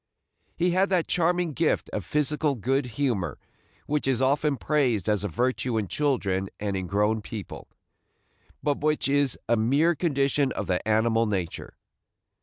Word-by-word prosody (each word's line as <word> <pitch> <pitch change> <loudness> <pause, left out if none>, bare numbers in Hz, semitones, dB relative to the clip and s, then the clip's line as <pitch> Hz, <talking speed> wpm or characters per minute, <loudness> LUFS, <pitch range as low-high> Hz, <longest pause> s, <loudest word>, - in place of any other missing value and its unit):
He 175 +1 +1
had 190 +3 +2
that 180 -3 +2
charming 175 -1 +1
gift 160 +2 0
of 105 - -3
physical 150 - 0
good 130 +3 0
humor 120 -11 -1 0.5
which 150 -2 -1
is 130 -3 +1
often 140 +2 +2
praised 125 - +1
as 105 -1 +1
a - - 0
virtue 125 +4 -1
in 105 -3 -1
children 100 -10 0
and 100 -1 -2
in 95 -1 -3
grown 105 +3 +1
people, 105 -2 -8 1.0
but 145 -1 0
which 150 -1 +1
is 140 -2 +2
a 115 - +3
mere 140 +10 +3
condition 140 -4 +1
of - - -3
the 90 +2 -1
animal 110 +1 +2
nature. 95 -5 -4
130 Hz, 155 wpm, -26 LUFS, 105-150 Hz, 1.0 s, a